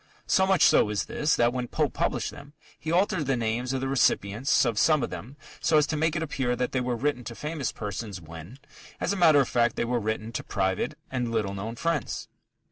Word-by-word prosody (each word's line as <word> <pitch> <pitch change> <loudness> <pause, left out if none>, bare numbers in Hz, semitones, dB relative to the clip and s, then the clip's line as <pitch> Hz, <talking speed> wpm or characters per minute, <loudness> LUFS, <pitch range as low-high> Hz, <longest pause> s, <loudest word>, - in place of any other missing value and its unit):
So 190 -1 +3
much 190 -2 +4
so - - +5
is 105 -1 -1
this, 150 0 +1
that 120 0 +2
when 125 -1 -2
Pope - - -1
published - - -1
them, 140 +1 -12 0.3
he 160 - -4
altered 180 -4 +1
the 135 -2 +1
names 120 +2 -1
of 135 -1 -2
the 135 - -1
recipients 130 -1 +2
of 115 -3 0
some 155 -5 +4
of - - -3
them 105 +11 -8 0.2
so 155 - +3
as 150 - +5
to 155 - -2
make 160 +1 +1
it 160 - -1
appear 130 -5 -1
that 125 +1 -2
they 130 - 0
were 125 -1 -1
written 125 +1 -1
to 115 - -6
famous 150 -2 -3
persons 105 -2 -5
when, 85 - -11 0.4
as - - 0
a - - -2
matter 160 -6 +6
of 130 - 0
fact, 120 -1 +1
they - - -1
were 120 0 0
written 110 +1 -3
to 115 - -4
private 95 -2 -1
and 125 -2 -1
little 105 -4 -1
known 105 +4 -5
friends. 165 +1 -2
125 Hz, 230 wpm, -27 LUFS, 110-150 Hz, 0.4 s, matter